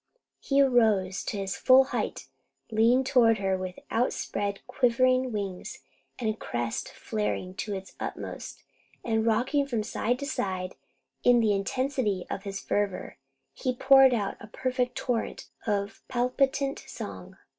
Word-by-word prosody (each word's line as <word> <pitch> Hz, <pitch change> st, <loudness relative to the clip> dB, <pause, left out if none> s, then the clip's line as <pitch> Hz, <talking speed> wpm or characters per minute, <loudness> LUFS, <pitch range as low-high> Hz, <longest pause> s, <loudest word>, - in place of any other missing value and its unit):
He 275 Hz, 0 st, +1 dB
arose 220 Hz, -8 st, +3 dB
to -, -, -3 dB
his 195 Hz, -1 st, -3 dB
full 260 Hz, +1 st, +7 dB
height, 265 Hz, -, -3 dB, 0.4 s
leaned 235 Hz, +4 st, +4 dB
toward 235 Hz, -4 st, +4 dB
her 195 Hz, -1 st, 0 dB
with 185 Hz, -1 st, -5 dB
outspread 205 Hz, -4 st, -1 dB
quivering 255 Hz, +1 st, +2 dB
wings, 200 Hz, -4 st, -4 dB, 0.4 s
and 220 Hz, -3 st, -2 dB
crest 120 Hz, -, -3 dB
flared 210 Hz, -7 st, -3 dB
to 210 Hz, -, -3 dB
the 195 Hz, -1 st, -5 dB
utmost, -, -, -6 dB, 0.4 s
and 220 Hz, -1 st, +1 dB
rocking 260 Hz, +6 st, +2 dB
from 235 Hz, -5 st, -1 dB
side 240 Hz, +2 st, -1 dB
to 280 Hz, -, -5 dB
side 185 Hz, -9 st, -2 dB, 0.5 s
in 245 Hz, -1 st, +6 dB
the 220 Hz, -3 st, +3 dB
intensity 210 Hz, -1 st, -1 dB
of 195 Hz, -, -4 dB
his 200 Hz, 0 st, -4 dB
fervour, 205 Hz, -7 st, -2 dB, 0.3 s
he 255 Hz, -1 st, -2 dB
poured 265 Hz, 0 st, +6 dB
out 205 Hz, -3 st, -2 dB
a -, -, -10 dB
perfect 250 Hz, +2 st, -1 dB
torrent 230 Hz, -, -2 dB, 0.2 s
of 200 Hz, -1 st, -1 dB
palpitant 270 Hz, +3 st, 0 dB
song. -, -, -8 dB
225 Hz, 135 wpm, -28 LUFS, 200-255 Hz, 0.5 s, full